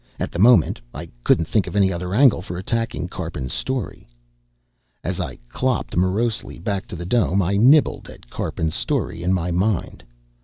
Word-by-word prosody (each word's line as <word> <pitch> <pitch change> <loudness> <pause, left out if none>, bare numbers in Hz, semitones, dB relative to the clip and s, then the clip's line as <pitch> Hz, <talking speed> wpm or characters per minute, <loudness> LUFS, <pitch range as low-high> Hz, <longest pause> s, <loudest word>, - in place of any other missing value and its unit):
At - - -3
the 85 - -5
moment, 115 -4 +5
I - - -7
couldn't 85 - +3
think 105 +4 0
of - - -6
any 95 -2 +3
other 90 +1 -4
angle 130 -4 +5
for 90 -1 -6
attacking 95 -4 -2
Karpin's 80 -9 -5
story. 130 -8 -3 1.0
As - - -3
I - - -4
clopped 130 - -2
morosely 100 +6 0
back 95 +1 -3
to - - -7
the 85 +1 -6
dome, 100 -1 +2
I 95 +1 +1
nibbled 135 +9 +4
at - - -14
Karpin's 80 +5 -3
story 85 - -2
in 90 +2 0
my 90 -1 0
mind. 95 +2 -1
95 Hz, 175 wpm, -22 LUFS, 85-115 Hz, 1.0 s, moment